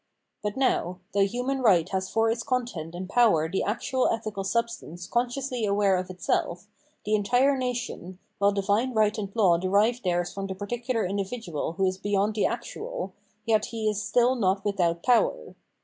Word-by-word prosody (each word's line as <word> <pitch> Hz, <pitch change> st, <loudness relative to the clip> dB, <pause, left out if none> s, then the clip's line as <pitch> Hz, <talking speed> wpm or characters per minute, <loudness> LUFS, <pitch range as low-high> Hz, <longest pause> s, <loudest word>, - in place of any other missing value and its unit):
But, 210 Hz, +2 st, -3 dB
now, 185 Hz, -9 st, +1 dB
though 200 Hz, 0 st, +3 dB
human 250 Hz, +5 st, -2 dB
right 185 Hz, -8 st, +4 dB
has 190 Hz, -1 st, -2 dB
for 225 Hz, 0 st, +2 dB
its 230 Hz, 0 st, -2 dB
content 230 Hz, -11 st, -3 dB
and 185 Hz, +1 st, -5 dB
power 195 Hz, -8 st, +3 dB
the 185 Hz, +4 st, -1 dB
actual 255 Hz, +4 st, 0 dB
ethical 215 Hz, -3 st, -3 dB
substance 230 Hz, -5 st, -3 dB
consciously 245 Hz, +3 st, -1 dB
aware 200 Hz, -1 st, +3 dB
of 180 Hz, 0 st, -3 dB
itself, 180 Hz, 0 st, -2 dB, 0.4 s
the 210 Hz, -, 0 dB
entire 245 Hz, +7 st, +3 dB
nation, 245 Hz, -8 st, -4 dB, 0.2 s
while 200 Hz, 0 st, +4 dB
divine 205 Hz, +5 st, 0 dB
right 215 Hz, -1 st, +3 dB
and 210 Hz, -3 st, -4 dB
law 185 Hz, -7 st, +4 dB
derive 205 Hz, +6 st, +2 dB
theirs 175 Hz, -2 st, -1 dB
from 195 Hz, 0 st, -4 dB
the 190 Hz, -, -5 dB
particular 230 Hz, +3 st, -2 dB
individual 195 Hz, -4 st, -3 dB
who 190 Hz, +2 st, 0 dB
is 185 Hz, 0 st, -1 dB
beyond 205 Hz, +1 st, +1 dB
the 210 Hz, -, +2 dB
actual, -, -, -5 dB, 0.3 s
yet 220 Hz, -2 st, +2 dB
he 225 Hz, -1 st, -3 dB
is 210 Hz, -1 st, 0 dB
stni 240 Hz, +5 st, +2 dB
not 195 Hz, -1 st, +1 dB
without 175 Hz, -4 st, 0 dB
power. 230 Hz, -, +2 dB
205 Hz, 170 wpm, -27 LUFS, 190-240 Hz, 0.4 s, right